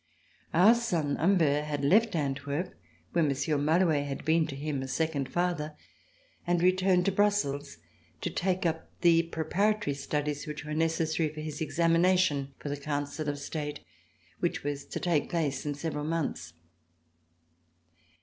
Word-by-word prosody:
Our 185 Hz, +7 st, +7 dB
son 175 Hz, -12 st, 0 dB
Humbert 155 Hz, -5 st, +3 dB
had 145 Hz, -2 st, -2 dB
left 215 Hz, +6 st, +4 dB
Antwerp, 140 Hz, +3 st, -2 dB, 0.4 s
where 170 Hz, -, +2 dB
Monsieur 140 Hz, +1 st, 0 dB
Malouet 155 Hz, -1 st, +2 dB
had 135 Hz, -1 st, -5 dB
been 160 Hz, 0 st, +3 dB
to 140 Hz, -, -6 dB
him 145 Hz, -1 st, -3 dB
a 135 Hz, -, -4 dB
second 145 Hz, 0 st, -1 dB
father, 170 Hz, -4 st, -1 dB, 0.7 s
and 175 Hz, 0 st, +2 dB
returned 185 Hz, 0 st, +3 dB
to 195 Hz, -, +3 dB
Brussels 190 Hz, -, 0 dB, 0.4 s
to -, -, -2 dB
take 185 Hz, 0 st, -1 dB
up 165 Hz, -1 st, -1 dB
the 170 Hz, -1 st, +6 dB
preparatory 170 Hz, +2 st, 0 dB
studies 145 Hz, +2 st, -3 dB
which 150 Hz, -1 st, -6 dB
were 150 Hz, -, -4 dB
necessary 160 Hz, 0 st, +1 dB
for 155 Hz, 0 st, -8 dB
his 155 Hz, -1 st, -6 dB
examination 165 Hz, -3 st, +2 dB
for 145 Hz, -, -6 dB
the 145 Hz, -, -2 dB
Council 145 Hz, +1 st, -3 dB
of 145 Hz, -, -2 dB
State 150 Hz, 0 st, -5 dB, 0.6 s
which -, -, -1 dB
was 145 Hz, -1 st, -3 dB
to -, -, -5 dB
take 165 Hz, -5 st, +1 dB
place 155 Hz, -4 st, -1 dB
in 145 Hz, -, -1 dB
several 150 Hz, 0 st, -3 dB
months. 165 Hz, -1 st, -2 dB
155 Hz, 150 wpm, -29 LUFS, 145-175 Hz, 0.7 s, Our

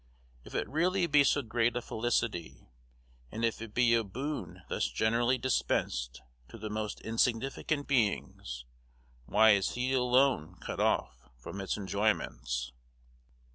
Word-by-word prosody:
If -, -, -11 dB
it -, -, -1 dB
really 180 Hz, +4 st, +1 dB
be 150 Hz, -3 st, +5 dB
so 140 Hz, +1 st, +2 dB
great 115 Hz, +1 st, +1 dB
a 120 Hz, -, -1 dB
felicity, 110 Hz, -7 st, -2 dB, 0.6 s
and 115 Hz, +1 st, -1 dB
if 115 Hz, -1 st, -1 dB
it 115 Hz, -2 st, -7 dB
be 120 Hz, -1 st, +4 dB
a 115 Hz, -1 st, +3 dB
boon 115 Hz, -, -5 dB
thus -, -, 0 dB
generally 120 Hz, +3 st, +1 dB
dispensed 65 Hz, -, -1 dB, 0.3 s
to -, -, -10 dB
the 110 Hz, -1 st, -6 dB
most 105 Hz, -1 st, -3 dB
insignificant 130 Hz, +6 st, 0 dB
beings, 100 Hz, -, -1 dB, 0.6 s
why 110 Hz, +2 st, +6 dB
is 100 Hz, -2 st, +2 dB
he 125 Hz, +2 st, -1 dB
alone 125 Hz, -, +2 dB
cut -, -, -6 dB
off -, -, 0 dB
from 95 Hz, +11 st, -7 dB
its 95 Hz, -, -2 dB
enjoyments? 95 Hz, -, -1 dB
115 Hz, 135 wpm, -31 LUFS, 100-130 Hz, 0.6 s, why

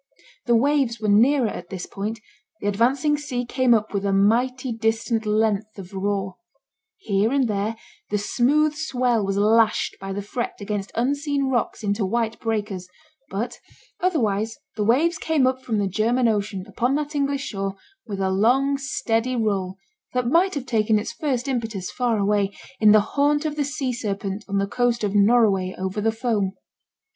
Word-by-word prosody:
The 240 Hz, -, +4 dB
waves 265 Hz, -2 st, +2 dB
were 215 Hz, -, -2 dB
nearer 240 Hz, +5 st, +4 dB
at 175 Hz, -4 st, -6 dB
this 185 Hz, -2 st, -5 dB
point; 215 Hz, +3 st, -5 dB, 0.4 s
the 205 Hz, -, -3 dB
advancing 255 Hz, +8 st, +2 dB
sea 250 Hz, -4 st, -3 dB
came 255 Hz, +1 st, +1 dB
up 215 Hz, -1 st, -1 dB
with 200 Hz, -1 st, -1 dB
a 200 Hz, -, +1 dB
mighty 245 Hz, +6 st, +2 dB
distant 225 Hz, 0 st, -1 dB
length 215 Hz, 0 st, 0 dB
of 190 Hz, 0 st, -10 dB
roar; 195 Hz, -1 st, -2 dB, 0.6 s
here 210 Hz, -, 0 dB
and 275 Hz, -2 st, +2 dB
there 210 Hz, +1 st, -1 dB, 0.3 s
the 210 Hz, -, +1 dB
smooth 285 Hz, +8 st, +2 dB
swell 250 Hz, -7 st, 0 dB
was 195 Hz, 0 st, -1 dB
lashed 220 Hz, +1 st, +3 dB
by 195 Hz, 0 st, -5 dB
the 200 Hz, +1 st, -3 dB
fret 235 Hz, +4 st, -3 dB
against 200 Hz, -1 st, -4 dB
unseen 280 Hz, +2 st, 0 dB
rocks 240 Hz, -2 st, -1 dB
into 205 Hz, +1 st, 0 dB
white 225 Hz, +3 st, -1 dB
breakers; 210 Hz, -5 st, -3 dB, 0.4 s
but 230 Hz, +5 st, -4 dB, 0.4 s
otherwise 225 Hz, -, 0 dB, 0.2 s
the 215 Hz, -, -1 dB
waves 310 Hz, +10 st, +2 dB
came 310 Hz, -5 st, +2 dB
up 260 Hz, 0 st, 0 dB
from 235 Hz, -4 st, -2 dB
the 205 Hz, -, +1 dB
German 230 Hz, +6 st, +1 dB
Ocean 205 Hz, -3 st, -1 dB
upon 250 Hz, +3 st, 0 dB
that 300 Hz, +1 st, -2 dB
English 280 Hz, -1 st, 0 dB
shore 195 Hz, -2 st, -3 dB, 0.3 s
with 200 Hz, -3 st, -4 dB
a 190 Hz, -1 st, +1 dB
long 265 Hz, +8 st, +2 dB
steady 255 Hz, -3 st, -1 dB
roll 200 Hz, -5 st, -1 dB, 0.4 s
that 250 Hz, -1 st, 0 dB
might 340 Hz, +9 st, +3 dB
have 275 Hz, -3 st, -3 dB
taken 220 Hz, -3 st, +2 dB
its 210 Hz, -, -3 dB
first 270 Hz, -4 st, -2 dB
impetus 225 Hz, -8 st, -3 dB
far 245 Hz, -3 st, 0 dB
away, 200 Hz, -1 st, +2 dB, 0.3 s
in 215 Hz, -1 st, +6 dB
the 215 Hz, 0 st, +7 dB
haunt 290 Hz, +6 st, +1 dB
of 300 Hz, -1 st, -2 dB
the 295 Hz, -, 0 dB
sea 280 Hz, -3 st, -2 dB
serpent 200 Hz, -2 st, -3 dB
on 200 Hz, 0 st, -1 dB
the 195 Hz, -, +2 dB
coast 240 Hz, +2 st, 0 dB
of 200 Hz, -1 st, 0 dB
'Norroway 200 Hz, -3 st, +3 dB
over 190 Hz, +2 st, -3 dB
the 225 Hz, +1 st, +2 dB
foam.' 220 Hz, -4 st, -1 dB
225 Hz, 175 wpm, -23 LUFS, 205-255 Hz, 0.6 s, the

